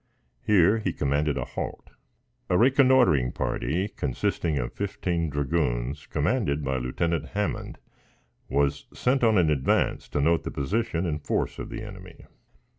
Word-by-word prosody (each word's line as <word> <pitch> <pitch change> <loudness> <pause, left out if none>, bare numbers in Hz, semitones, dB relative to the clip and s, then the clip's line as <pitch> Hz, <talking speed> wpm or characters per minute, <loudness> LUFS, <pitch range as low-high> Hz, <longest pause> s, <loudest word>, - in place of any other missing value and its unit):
Here 105 +1 +4
he 95 -6 -2
commanded 75 +1 0
a - - -2
halt. - - -6 0.6
A 90 - +3
reconnoitering 125 - +4
party, 85 +11 -1
consisting 75 0 -2
of - - -3
fifteen 85 -4 -2
dragoons, 70 -2 -1
commanded 75 - 0
by 65 -1 -1
Lieutenant 80 +7 -1
Hammond, 105 0 -2 0.7
was 70 +1 0
sent 125 +1 +1
on 110 -2 +4
in 80 -4 +4
advance 65 -3 +1
to - - -1
note 80 +3 +2
the - - -4
position 90 +4 -1
and 75 -3 -3
force - - -1
of - - -6
the 110 -1 -6
enemy. 95 -4 -11
80 Hz, 140 wpm, -26 LUFS, 70-105 Hz, 0.7 s, Here